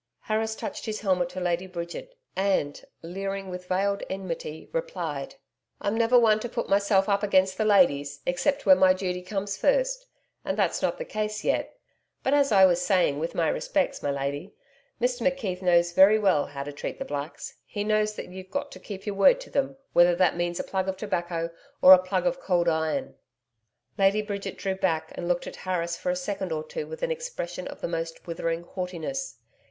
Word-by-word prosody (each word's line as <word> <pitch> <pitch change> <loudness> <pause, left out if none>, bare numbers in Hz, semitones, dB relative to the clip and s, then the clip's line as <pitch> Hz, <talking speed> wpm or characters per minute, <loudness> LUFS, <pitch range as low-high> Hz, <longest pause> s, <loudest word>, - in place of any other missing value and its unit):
Harris 220 0 -1
touched - - -6
his 215 -1 -3
helmet 185 -4 +1
to 185 +1 -6
Lady 175 +1 -1
Bridget 180 - -7 0.2
and, 190 -7 0 0.2
leering 195 +2 -4
with 180 0 -7
veiled 200 +2 0
enmity, 170 -5 -5
replied: - - -3 0.4
'I'm 205 +2 -1
never 230 +2 +4
one 220 -3 +5
to 240 - -5
put 235 0 -3
myself 200 -1 +3
up 200 -1 +2
against 190 -2 +3
the 215 - 0
ladies, 145 -8 +3
except 275 +11 0
where 280 - +8
my 185 -6 +5
duty 180 -1 -3
comes 195 +1 -3
first - - +1 0.4
and - - -2
that's - - +1
not - - 0
the - - -5
case 215 - -3
yet. - - -1 0.5
But 265 - +1
as 280 -2 +3
I 190 -2 +7
was 175 -1 +3
saying, 180 -8 +2
with 165 +2 -3
my 165 -2 +2
respects, 290 - 0
my 145 - -1
lady, 140 +6 -3 0.4
Mr 245 0 0
McKeith 230 -9 -1
knows 175 -1 +3
very 195 +4 +7
well 190 -9 +2
how 140 -1 -6
to 145 +1 -7
treat 145 - -5
the - - -5
blacks. 145 +2 -6
He 205 - -4
knows 215 0 +1
that - - -6
you've 185 +1 -10
got 285 +5 -3
to - - -10
keep 195 -2 -8
your 205 - -2
word 340 - +5
to - - -11
them, 275 -1 -1 0.2
whether 175 0 +6
that 180 -1 +3
means 175 0 -2
a - - -1
plug 190 0 -2
of 190 - -3
tobacco 170 -5 -2 0.3
or 185 - +10
a 185 - +7
plug 185 +2 -1
of 265 0 0
cold 175 -7 +1
iron.' 160 - 0 0.9
Lady 200 +2 +4
Bridget 200 -2 -5
drew 195 -1 -1
back 165 -4 -1
and 175 - -5
looked 175 0 0
at - - -8
Harris 170 -2 -2
for - - -3
a 180 - +1
second 190 0 -3
or 155 -1 -2
two 465 - -6
with 480 +1 -8
an - - 0
expression 465 - -5
of - - -9
the - - -1
most 165 -1 -4
withering 165 0 -2
haughtiness. 185 +9 -5
190 Hz, 200 wpm, -26 LUFS, 175-215 Hz, 0.9 s, or